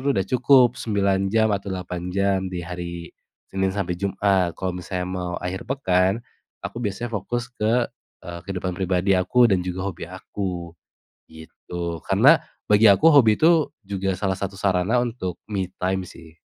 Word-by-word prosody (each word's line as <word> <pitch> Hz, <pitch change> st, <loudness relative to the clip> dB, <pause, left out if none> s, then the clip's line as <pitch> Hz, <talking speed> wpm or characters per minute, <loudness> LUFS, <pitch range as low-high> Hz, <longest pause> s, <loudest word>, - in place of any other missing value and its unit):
tuh 140 Hz, -, +3 dB
udah 95 Hz, -, +1 dB
cukup 125 Hz, 0 st, +5 dB
9 100 Hz, -3 st, +1 dB
jam 110 Hz, -1 st, +3 dB
atau 100 Hz, 0 st, -3 dB
8 90 Hz, -1 st, -5 dB
jam 100 Hz, 0 st, +2 dB
di 90 Hz, -, -3 dB
hari 85 Hz, -1 st, -6 dB, 0.4 s
Senin 95 Hz, 0 st, +1 dB
sampe 95 Hz, -3 st, -2 dB
Jumat. 95 Hz, -1 st, +1 dB
Kalo 95 Hz, -1 st, -2 dB
misalnya 90 Hz, 0 st, -4 dB
mau 90 Hz, -1 st, -4 dB
akhir 90 Hz, +1 st, -4 dB
pekan, 95 Hz, -6 st, +1 dB, 0.4 s
aku -, -, -6 dB
biasanya 120 Hz, +2 st, -3 dB
fokus 120 Hz, +4 st, -3 dB
ke, 120 Hz, +1 st, +1 dB, 0.4 s
eee, 85 Hz, 0 st, -7 dB
kehidupan 95 Hz, -1 st, -3 dB
pribadi 95 Hz, +1 st, +1 dB
aku 120 Hz, +7 st, +3 dB
dan 95 Hz, -3 st, +2 dB
juga 90 Hz, +1 st, -4 dB
hobi 90 Hz, -, -6 dB
aku, 90 Hz, -2 st, -5 dB, 0.6 s
gitu. 85 Hz, +1 st, -7 dB
Karena -, -, +6 dB, 0.4 s
bagi 105 Hz, +2 st, +6 dB
aku 125 Hz, +12 st, +6 dB
hobi 115 Hz, -7 st, +6 dB
itu 160 Hz, -1 st, +4 dB, 0.2 s
juga 95 Hz, -1 st, -2 dB
salah 95 Hz, 0 st, -1 dB
satu 100 Hz, 0 st, -4 dB
sarana 95 Hz, +3 st, +1 dB
untuk 110 Hz, -7 st, -4 dB
me 95 Hz, -3 st, -1 dB, 0.2 s
time 95 Hz, 0 st, 0 dB
sih. 80 Hz, -1 st, -14 dB
95 Hz, 160 wpm, -23 LUFS, 90-105 Hz, 0.6 s, Karena